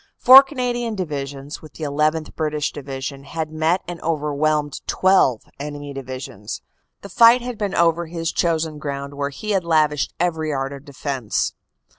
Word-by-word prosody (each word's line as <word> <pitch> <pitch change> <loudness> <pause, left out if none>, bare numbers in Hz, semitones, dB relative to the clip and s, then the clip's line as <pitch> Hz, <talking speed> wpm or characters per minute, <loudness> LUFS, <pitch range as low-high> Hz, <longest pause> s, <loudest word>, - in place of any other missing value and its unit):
Four 260 +2 +10
Cana 255 -3 -2
dian 240 -2 -3
Divisions, 145 -5 -5
with 155 -3 -13
the 160 - -8
llth. 155 +2 0
British 150 -1 -1
Division, 135 0 -6
had 155 +2 -4
met 160 +4 +1
and 175 -1 -6
overwhelmed 150 -1 0
twelve 185 - +3 0.2
enemy 145 0 -6
divisions. 130 -6 -7 0.4
The 200 - -8
fight 235 +5 +6
had 245 -3 -5
been 200 -2 -2
over 170 0 +2
his 165 0 -3
chosen 160 -2 0
ground 140 -1 -5
where 140 0 -2
he 215 +9 -5
had 195 -3 +1
lavished 155 -4 +1
every 160 -3 0
art 135 -1 -2
of 140 +1 -10
defense. 135 -5 -2
155 Hz, 160 wpm, -21 LUFS, 140-170 Hz, 0.4 s, Four